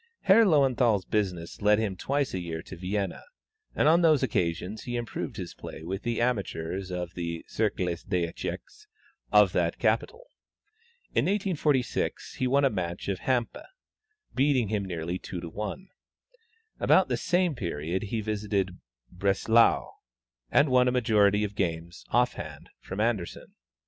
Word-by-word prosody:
Herr 215 +4 +6
Löwenthal's 125 - +3
business 90 -6 -2
led 105 0 +5
him 105 -3 -1
twice 140 +7 -1
a 95 - -1
year 85 -2 -5
to 95 - -9
Vienna, 95 +3 -3 0.5
and - - +3
on 165 +3 +5
those 155 -5 +4
occasions 90 -2 -1
he 120 - -3
improved 120 -1 -4
his 90 -4 -6
play - - -9
with 95 +4 -4
the 120 0 -2
amateurs 95 -6 -2
of 90 -1 -4
the 85 -1 -4
Cercle 105 -4 0
des 90 +1 -1
Echecs 425 - -7 0.4
of - - +6
that - - 0
capital. 485 +2 0 0.9
In - - +2
1846, 170 - 0
he 130 - +1
won 140 +2 +3
a 135 - +3
match 90 -3 -4
of 95 -3 -1
Hampe, 125 0 -1 0.7
beating 130 -5 +2
him 105 -2 -1
nearly 85 0 -3
2 90 - -6
to 85 -1 -7
1. 105 - -6 0.9
About - - +4
the - - 0
same 175 -2 +1
period 85 - -3
he 110 +2 -2
visited 100 -3 -2 0.3
Breslau, 100 +5 +3 0.6
and 145 +1 +4
won 125 0 +5
a - - +3
majority 105 -4 +3
of 105 -1 -3
games 85 -3 -3
(off 125 +1 +3
hand) - - -9
from 95 - -7
Anderssen. 110 -6 -2
105 Hz, 150 wpm, -28 LUFS, 90-125 Hz, 0.9 s, Herr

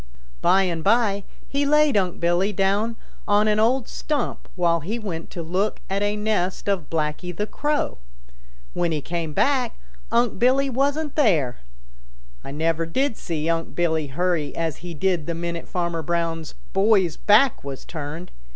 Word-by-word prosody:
By 195 +1 +5
and 170 -3 -2
by 205 -1 +2 0.2
he 280 +1 0
laid 300 -1 +4
Unc' 185 -3 +1
Billy 175 +4 +2
down 205 +4 +1 0.3
on 205 +1 +4
an 210 0 +3
old 240 +2 +2
stump 295 -5 -3
while 170 -2 +2
he 195 +9 -3
went 185 -8 -5
to 170 - -6
look 185 +6 -1
at 195 +1 0
a 205 0 +1
nest 210 -4 -1
of 195 -6 0
Blacky 155 +2 -2
the 210 - 0
Crow. 295 - -1 0.7
When 175 -1 0
he 155 - 0
came 165 +1 -3
back 255 - +1 0.3
Unc' 235 -4 +2
Billy 265 +3 +3
wasn't 285 +4 0
there. 165 - +2 0.8
I - - -8
never 165 +3 0
did 265 +8 0
see 160 -5 -3
Unc' 165 0 -1
Billy 160 -3 +1
hurry 155 0 -1
as 165 -3 -2
he 175 -1 -8
did 175 -2 0
the 170 - -2
minute 170 0 -4
Farmer 170 -2 -1
Brown's 165 0 -2 0.2
boy's 195 -4 +3
back 220 +5 +4
was 140 -1 -7
turned. 160 +2 -6
180 Hz, 160 wpm, -23 LUFS, 165-220 Hz, 0.8 s, By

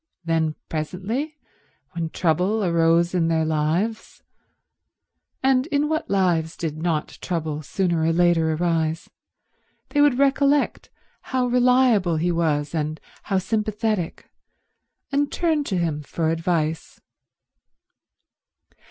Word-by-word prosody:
Then 160 -2 0
presently 195 - -3 0.5
when 170 -2 -3
trouble 180 +7 +1
arose 170 0 +3
in 170 -3 +2
their 160 -1 +1
lives—and 215 - -3
in 295 -1 0
what 315 +1 -2
lives 175 -4 +1
did 160 -3 -3
not 160 -1 -2
trouble 160 -4 -3
sooner 170 +2 -1
or 160 +1 +2
later 170 -1 +3
arise?—they 165 - -3
would 290 -4 +4
recollect 280 +1 +2 0.3
how 255 -1 -1
reliable 245 -7 +3
he 175 +3 +1
was 155 -3 0
and 155 -1 -2 0.3
how 195 - 0
sympathetic, 215 -2 -2 0.8
and 285 +1 +1
turn 320 -4 +1
to 190 - -1
him 160 -4 -1
for 160 +2 -2
advice. 165 -1 -2
175 Hz, 105 wpm, -23 LUFS, 160-230 Hz, 0.8 s, would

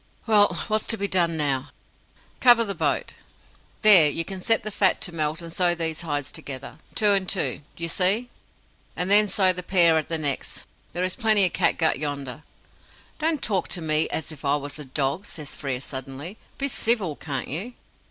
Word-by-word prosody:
"Well, 210 -2 +3
what's 215 0 -1
to 225 - +2
be 200 0 -1
done 170 -3 0
now?" 140 -2 -1 0.7
"Cover 240 -2 +5
the 200 -3 -4
boat. - - -2 0.7
There, 190 -8 +8
you 165 +3 -2
can 190 -2 -8
set 225 +2 +2
the 215 - -6
fat 195 -1 +2
to 175 - -1
melt, 155 +1 -2
and 165 -1 -10
sew 175 -1 +2
these 165 -2 -1
hides 145 -4 -4
together. 140 +2 -8 0.2
Two 210 -2 +4
and 195 -2 +1
two, 190 - -1
do 170 - -6
you - - +3
see? 200 +8 +2 0.6
and 180 +2 -2
then 210 +1 +9
sew 190 -2 +2
the 180 - -6
pair 170 -3 +4
at 155 - -7
the 165 - 0
necks. 145 -3 -2 0.3
There 175 - -2
is 185 0 -2
plenty 215 -4 +4
of 180 - -1
catgut 160 - +1
yonder." 145 -2 -5 0.8
"Don't 315 -2 -1
talk 195 -4 -1
to 175 - -4
me 155 0 +2
as 160 - -3
if 155 -2 -13
I 140 0 +1
was 145 +1 -7
a 150 - -8
dog!" 140 +7 -2
says 150 -3 -8
Frere 135 -4 -4
suddenly. 135 +8 -6 0.2
"Be 280 - -1
civil, 220 - 0
can't 135 -4 -6
you." 195 - -3
170 Hz, 195 wpm, -23 LUFS, 150-200 Hz, 0.8 s, then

